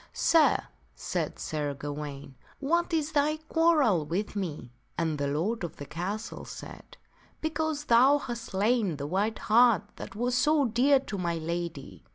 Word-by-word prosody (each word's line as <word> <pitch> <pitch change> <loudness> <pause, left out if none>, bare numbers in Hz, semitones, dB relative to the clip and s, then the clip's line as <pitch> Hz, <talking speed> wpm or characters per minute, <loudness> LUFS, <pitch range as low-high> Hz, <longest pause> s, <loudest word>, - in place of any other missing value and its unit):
" - - -35 0.2
Sir," 325 -2 +5 0.3
said - - -3
Sir 145 -2 -3
Gawaine, 145 -1 -6 0.2
" - - -30
what 340 +2 +2
is 315 -2 0
thy 305 0 +2
quarrel 310 - +3
with 185 +8 -3
me? 155 -11 -4
" - - -40
And 160 -3 -1
the 140 - 0
lord 175 +10 -1
of 170 - -5
the 145 - -8
castle 185 +9 -5
said, - - -10 0.2
" - - -31
Because 315 -1 -1
thou 260 +4 +6
hast 240 -5 -5
slain 205 -4 +1
the 140 - -4
white 200 +8 0
hart 235 0 +4
that 200 - -8
was 245 +3 -1
so 295 +2 +3
dear 260 +4 +4
to 200 -7 -6
my 170 -1 -1
lady." 165 - -5
210 Hz, 175 wpm, -28 LUFS, -, 0.3 s, thou